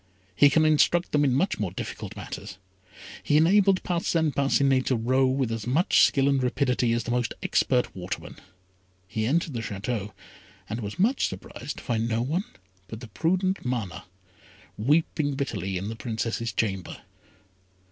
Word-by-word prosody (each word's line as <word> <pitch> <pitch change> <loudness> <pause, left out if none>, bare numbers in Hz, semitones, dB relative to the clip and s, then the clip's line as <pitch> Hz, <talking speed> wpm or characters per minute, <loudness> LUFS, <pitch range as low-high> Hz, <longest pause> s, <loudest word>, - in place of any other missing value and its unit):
He 145 - +6
can 155 +3 +3
instruct 155 +3 +3
them 145 -1 +3
in 140 - +3
much 185 +9 0
more 105 -4 -1
difficult 90 - -7
matters. - - -8 0.6
He 145 - +2
enabled 190 +4 +4
Parcin 170 -3 0
Parcinet 135 -1 +2
to 130 - +2
row 130 +3 +2
with 130 -2 0
as 115 0 -4
much 155 +9 +3
skill 135 0 +4
and 140 -1 +2
rapidity 125 -1 +1
as 120 - 0
the 120 - -4
most 120 -1 -1
expert 125 -2 +1
waterman. 90 0 -6 0.7
He 110 +1 -2
entered 160 +3 0
the 120 - -3
Château, 105 0 -4 0.6
and 110 +3 -4
was 105 -1 -6
much 230 +9 +2
surprised - - -7
to - - -9
find 115 -1 -1
no 115 +1 0
one 165 - -1 0.4
but 110 - -8
the 120 -2 -10
prudent 185 - 0
Mana, 115 -9 -3 0.7
weeping 145 +3 +1
bitterly 95 - -3
in 95 +3 -4
the 115 - -5
Princess's 115 0 -3
chamber. 95 -5 -3
130 Hz, 160 wpm, -26 LUFS, 115-150 Hz, 0.7 s, He